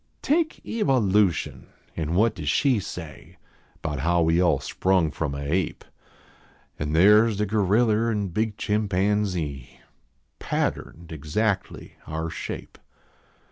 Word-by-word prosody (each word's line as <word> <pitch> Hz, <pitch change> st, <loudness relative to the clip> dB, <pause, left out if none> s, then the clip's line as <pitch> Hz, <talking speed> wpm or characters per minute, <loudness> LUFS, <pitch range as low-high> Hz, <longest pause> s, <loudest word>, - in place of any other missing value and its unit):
Take 315 Hz, +2 st, 0 dB
Kva 180 Hz, -, +1 dB
I 105 Hz, -6 st, +1 dB
v 105 Hz, 0 st, +6 dB
ution, 85 Hz, -3 st, -6 dB, 0.3 s
an 80 Hz, 0 st, -2 dB
what 110 Hz, +3 st, +3 dB
does 75 Hz, -8 st, -4 dB
she 130 Hz, -, +2 dB
say 90 Hz, -5 st, -9 dB, 0.5 s
Bout 75 Hz, -4 st, -3 dB
how 85 Hz, +4 st, +2 dB
we 80 Hz, +2 st, +3 dB
all 85 Hz, -6 st, +3 dB
sprung 90 Hz, +3 st, +1 dB
from 75 Hz, -2 st, -3 dB
a 70 Hz, -, -5 dB
ape? 90 Hz, +3 st, -1 dB, 0.9 s
An 75 Hz, 0 st, -2 dB
there 105 Hz, +7 st, +6 dB
s 110 Hz, -3 st, -2 dB
the 105 Hz, -, +1 dB
goriller 110 Hz, +2 st, +2 dB
and 100 Hz, -5 st, -2 dB
big 110 Hz, 0 st, -1 dB
chimpanx.ee, 100 Hz, -, -1 dB, 0.6 s
Patterned 85 Hz, +1 st, -3 dB
exactly 95 Hz, +7 st, -2 dB
our 80 Hz, +1 st, -4 dB
shape. -, -, -7 dB
95 Hz, 135 wpm, -25 LUFS, 80-105 Hz, 0.9 s, v